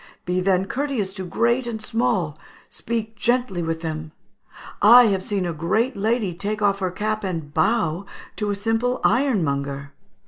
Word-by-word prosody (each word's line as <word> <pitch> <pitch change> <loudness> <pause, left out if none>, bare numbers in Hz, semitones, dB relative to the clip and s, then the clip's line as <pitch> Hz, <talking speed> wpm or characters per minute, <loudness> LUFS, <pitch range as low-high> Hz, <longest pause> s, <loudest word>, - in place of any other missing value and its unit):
Be 180 +1 0
then 190 0 +2
courteous 250 -6 -2
to 190 -2 -6
great 235 +6 +1
and 225 -2 -4
small; 215 -9 0 0.3
speak 225 -1 -4
gently 240 -4 0
with 165 -1 -2
them.... 155 -1 -5 0.7
I 240 +4 +9
have 195 -2 0
seen 195 -1 -2
a 170 - -2
great 215 - 0
lady 215 -2 0
take 205 +4 -3
off 200 -1 +2
her 185 -2 0
cap 215 +3 -2
and 165 -6 -4
bow 175 +1 +1 0.3
to 210 -1 -1
a 205 - 0
simple 225 +4 0
ironmonger. 140 - 0
200 Hz, 160 wpm, -23 LUFS, 175-230 Hz, 0.7 s, I